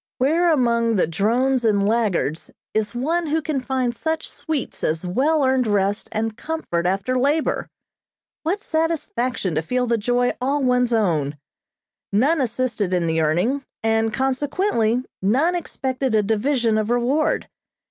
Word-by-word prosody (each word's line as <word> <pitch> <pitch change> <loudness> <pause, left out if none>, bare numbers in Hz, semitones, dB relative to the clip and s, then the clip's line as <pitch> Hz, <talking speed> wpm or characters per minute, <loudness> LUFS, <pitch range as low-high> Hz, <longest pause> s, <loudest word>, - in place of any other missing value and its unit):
Where 330 +6 +3
among 235 -5 +2
the 190 - +3
drones 240 +10 +1
and 205 -3 +2
laggards 205 -9 0 0.2
is 215 +1 -1
one 325 +7 0
who 310 +2 +1
can 295 -2 -2
find 255 -2 -1
such 320 +5 -2
sweets 310 -5 -4
as 160 +3 -1
well 280 - +2
earned 260 -2 +2
rest 200 -1 0
and 220 0 -2
comfort 220 - -2
after 195 +7 0
labor? 290 +4 +1 0.7
What 380 +6 -2
satisfaction 255 - -1
to 155 - 0
feel 250 +9 -1
the 235 -1 +1
joy 245 +3 +1
all 275 +2 0
one's 250 -1 +2
own. 160 -10 +1 0.7
None 275 +10 +3
assisted 235 -6 -1
in 175 -1 0
the 160 0 +1
earning, 180 - +1 0.2
and 225 0 +2
consequently 265 - 0 0.2
none 265 - +2
expected 265 -7 -2
a 210 - +3
division 225 +1 +1
of 215 0 -2
reward. 245 +6 +1
245 Hz, 145 wpm, -22 LUFS, 210-280 Hz, 0.7 s, Where